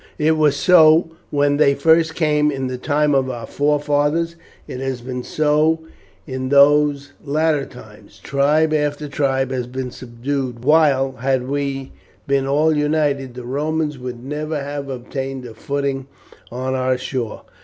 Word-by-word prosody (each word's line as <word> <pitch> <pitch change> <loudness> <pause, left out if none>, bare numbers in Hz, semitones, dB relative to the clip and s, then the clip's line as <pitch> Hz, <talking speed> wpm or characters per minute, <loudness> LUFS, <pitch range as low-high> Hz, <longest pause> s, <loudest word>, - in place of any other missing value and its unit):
It 155 +1 +2
was 150 -2 +3
so 160 +1 +5 0.2
when 145 0 +1
they 140 -2 +4
first 160 +3 +3
came 150 -2 +2
in 135 -2 -3
the 130 -1 -4
time 150 +2 +1
of 135 -1 +2
our 120 -3 -5
forefathers, 150 +4 0 0.3
it 125 - -6
has 135 -1 -3
been 125 +1 -5
so 155 +3 +1 0.4
in 130 -2 -4
these 145 0 +4
latter 150 0 0
times; - - -15
tribe 150 +3 +1
after 150 0 -1
tribe 135 -2 0
has 125 -2 -2
been 130 0 -5
subdued; 125 0 -5
while, 145 -3 +4
had 130 0 0
we 140 -1 -3 0.3
been 140 -1 +1
all 150 +3 +2
united, 150 -4 0
the 125 - -7
Romans 150 +2 -2
would 125 -1 -7
never 150 +2 -3
have 140 0 -5
obtained 130 +1 -5
a 115 - -9
footing 140 +2 -3 0.4
on 130 +2 -3
our 130 0 0
shore. 125 -3 -4
140 Hz, 150 wpm, -20 LUFS, 130-150 Hz, 0.4 s, so